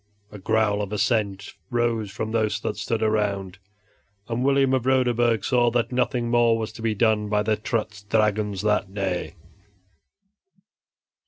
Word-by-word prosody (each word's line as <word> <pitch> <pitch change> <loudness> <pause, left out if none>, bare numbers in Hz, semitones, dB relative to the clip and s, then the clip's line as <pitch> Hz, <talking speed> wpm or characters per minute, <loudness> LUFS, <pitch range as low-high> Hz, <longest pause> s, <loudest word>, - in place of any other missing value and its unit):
A 105 - -9
growl 105 0 +1
of 100 -1 -4
assent 105 -2 -1 0.2
rose 120 -3 0
from 110 +2 -4
those 110 -1 0
that - - -3
stood 110 +2 -2
around, 100 -3 -1 0.7
and 120 +1 -2
William 135 -1 +3
of 130 -1 0
Roderburg 120 -3 +2
saw 120 -2 +3
that 120 +1 -1
nothing 125 -1 0
more 120 -1 +4
was 110 -1 -4
to 110 - -11
be 110 -1 0
done 105 -1 +1
by 105 0 +1
the 110 0 +1
Trutz 110 -1 -3
Dragons 105 -1 0
that 105 -2 0
day. 95 -2 -2
110 Hz, 150 wpm, -24 LUFS, 105-120 Hz, 0.7 s, more